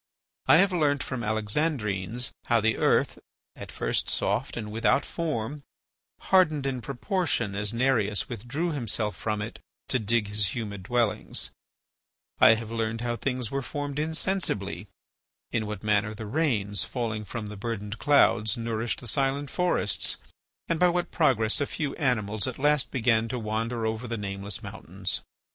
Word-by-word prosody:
I - - +8
have 195 +2 +5
learnt 145 -5 +2
from 130 - -4
the 115 - -3
Alexandrines 110 - -1
how 120 -1 +4
the 110 +1 +2
earth, - - +2 0.4
at - - -8
first - - 0
soft - - 0
and 105 -2 -4
without 115 +4 +2
form, 150 -4 -3 0.6
hardened 155 -7 +3
in 130 -2 -1
proportion 140 - -1
as 100 +1 0
Nereus 115 -5 +2
withdrew 130 - -3
himself 115 -6 -1
from 105 -1 -2
it 110 - -7 0.3
to 130 - +2
dig 110 0 +1
his 105 -2 +1
humid 105 -4 -4
dwellings; 110 +1 0 0.9
I 110 - +8
have 115 0 -6
learned 115 0 -1
how 120 0 -1
things 125 -2 -2
were 140 0 -1
formed 145 +1 -4
insensibly; 155 - -1 0.6
in 110 -2 0
what 105 0 -5
manner 105 0 +1
the 110 0 -6
rains, 105 -6 0
falling 110 -4 -3
from 110 +2 -5
the 105 0 -7
burdened 105 0 -4
clouds, 110 -4 +4
nourished 115 -1 -2
the 125 - -5
silent 135 +4 0
forests, 180 0 +1 0.5
and 165 -1 0
by 180 - +6
what 175 0 -1
progress 120 -7 +2
a 140 - +1
few 150 -3 -3
animals 110 -6 +1
at 130 - -4
last 145 0 +3
began 115 -3 +2
to 125 - -3
wander 115 +1 -2
over 110 +2 -2
the 115 0 -3
nameless 100 -1 -5
mountains. 90 +5 -3
115 Hz, 155 wpm, -27 LUFS, 105-140 Hz, 0.9 s, I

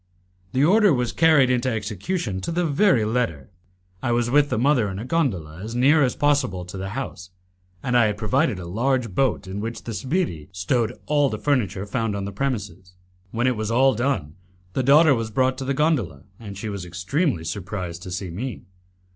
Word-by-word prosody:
The 135 +3 +3
order 205 +3 +5
was 125 -4 0
carried 155 -6 +4
into 125 +1 +1
execution 105 - -3
to 95 - -3
the 175 +1 0
very 145 - +3
letter. 105 - -2 0.5
I 120 - -1
was 120 0 +1
with 145 +1 +4
the - - -1
mother 125 -3 +2
in 95 - -5
a 110 - -5
gondola 95 - -1
as 110 +3 -6
near 140 +5 +4
as 130 -3 +2
possible 135 -11 +1
to 90 - -9
the 95 0 -4
house, 95 -9 -6 0.5
and 125 - 0
I 120 -3 +5
had 105 -1 -2
provided 120 - +1
a 90 - -7
large 115 +4 -1
boat 130 -2 +1
in 95 +2 -5
which 115 +2 -5
the 115 - -5
sbirri 130 - -2
stowed 110 +6 -1
all 145 -2 +2
the 110 - -4
furniture 105 - 0
found 115 0 -2
on 100 -1 -3
the 100 - -5
premises. 100 -6 -4 0.4
When 115 +5 -1
it 130 -1 +2
was 110 0 -3
all 130 +3 +4
done, 110 - -1 0.4
the - - 0
daughter 145 +3 +6
was 115 -3 -2
brought 130 +3 +1
to 135 - -4
the 135 +1 -1
gondola, 130 - 0 0.2
and 100 -4 -8
she 110 - -5
was 100 -3 -5
extremely 90 - -1
surprised 90 -2 -5
to 90 - -8
see 90 0 -4
me. 115 +6 -5
115 Hz, 200 wpm, -23 LUFS, 95-135 Hz, 0.5 s, daughter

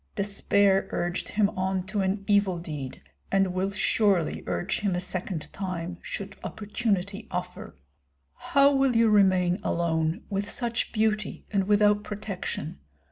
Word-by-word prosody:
Despair 200 -1 +2
urged 175 0 -2
him 210 -1 +2
on 185 0 -1
to 200 +1 -1
an 195 +1 -1
evil 200 -3 +3
deed, 150 -6 -6 0.3
and 195 -2 +2
will 185 +1 0
surely 200 -3 +1
urge 90 -1 -1
him 200 -4 0
a - - 0
second 185 -2 -3
time, 180 -2 -4
should 200 -1 -6
opportunity 205 -1 -2
offer. 180 0 -5 0.6
How 280 0 +3
will 270 -2 +3
you 230 -1 +5
remain 185 -2 +4
alone, 165 +2 0
with 200 0 -2
such 235 -2 -1
beauty 215 -2 -1
and 195 -2 +1
without 210 0 +4
protection? 200 - -5
195 Hz, 135 wpm, -27 LUFS, 180-210 Hz, 0.6 s, you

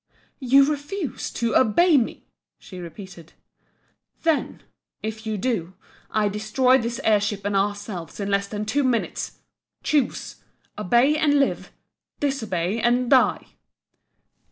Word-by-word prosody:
"You 275 +1 +5
refuse 295 - -3
to 235 -1 -1
obey 310 - +4
me?" 245 -5 0 0.3
she 185 - -11
repeated 175 -1 -10 0.9
"Then 325 -3 0 0.4
if 220 0 -5
you 215 -1 -1
do 190 -5 -2 0.3
I 215 -1 +1
destroy 215 +6 +2
this 235 +1 -3
air 215 -2 +4
ship 205 -1 -3
and 205 0 -1
ourselves 200 -3 -3
in 200 0 -2
less 200 0 +1
than 210 +1 -4
two 280 +7 0
minutes! 245 -3 -2 0.4
Choose! 290 -5 -1 0.4
Obey, 240 +8 +3
and 295 -2 +3
live! 275 - 0 0.5
disobey 220 -8 -1
and 245 +1 +2
die!" 260 -2 +4
220 Hz, 125 wpm, -23 LUFS, 205-265 Hz, 0.9 s, You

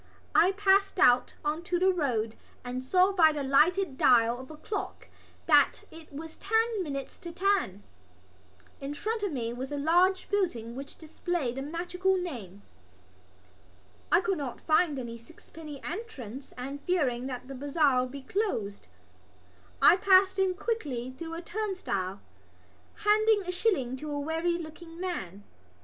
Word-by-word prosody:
I 365 - +5
passed 395 0 +3
out 250 -9 +4
on 305 +2 -1
to 355 0 0
the 375 +2 +3
road 235 -10 -1 0.3
and 250 +1 -4
saw 365 +8 +4
by 330 -5 +5
the 295 -2 -3
lighted 300 +3 +3
dial 235 0 +4
of 260 - -10
a 310 - -10
clock 405 +6 -5 0.4
that - - +4
it 320 -1 -13
was 315 +3 -8
ten 445 +1 +1
minutes 275 -5 -5
to 340 - -8
ten. 360 - 0 1.0
In 280 +1 -5
front 440 +7 -2
of 405 -3 -1
me 235 -4 -3
was 260 +3 -6
a 290 - -2
large 355 +6 +3
building 245 - -1
which 275 +2 -8
displayed 320 -4 -3
the - - -2
magical 355 +5 -1
name. 220 - -6 1.5
I - - +5
could 365 -2 -1
not 265 -4 -5
find 310 -2 +2
any 235 -2 -6
sixpenny 305 +3 -11
entrance 275 - -7
and, 275 +3 -6
fearing 265 -8 0
that 255 -1 -6
the 275 - -7
bazaar 280 -1 +2
would 250 0 -4
be 280 -1 -8
closed, 260 - -2 1.0
I 360 - +8
passed 380 -1 +5
in 375 -1 +2
quickly 290 - -3
through 330 +2 -6
a 335 - -6
turnstile, 255 - -3 0.8
handing 425 0 +4
a 360 - -3
shilling 355 - 0
to 300 +3 -7
a 290 0 -2
weary 325 +3 -1
looking 330 +1 -10
man. 205 - -5
315 Hz, 155 wpm, -29 LUFS, 260-370 Hz, 1.5 s, I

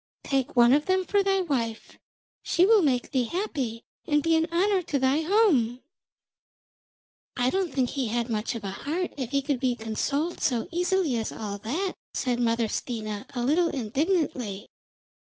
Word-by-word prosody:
Take 270 0 -1
one 240 0 +6
of 295 +4 +2
them 375 0 +2
for 405 +1 +2
thy 390 -1 +2
wife; 240 -10 -3 0.4
she 350 - +3
will 435 0 +6
make 255 -6 +1
thee 255 -3 +1
happy 265 - -3 0.2
and 295 -2 +2
be 330 0 +3
an 320 0 +2
honour 380 +3 +2
to 300 -4 -2
thy 265 +3 +2
home.' 310 - +2 1.5
'I 250 0 +2
don't 380 -3 0
think 255 -3 0
he 270 -4 -1
had 235 +1 -1
much 220 0 -2
of 225 - -6
a 195 - -3
heart 320 - -3
if 260 -5 -4
he 275 +1 0
could 280 -2 -1
be 255 -2 +1
consoled 275 +9 -2
so 245 0 0
easily 350 -5 +1
as 225 - -2
all 205 -2 -5
that,' 320 - -2 0.2
said 245 -2 0
Mother 230 -1 +1
Stina, 215 -3 -4
a 240 - -1
little 330 +6 +3
indignantly. 260 - -1
270 Hz, 170 wpm, -26 LUFS, 235-340 Hz, 1.5 s, one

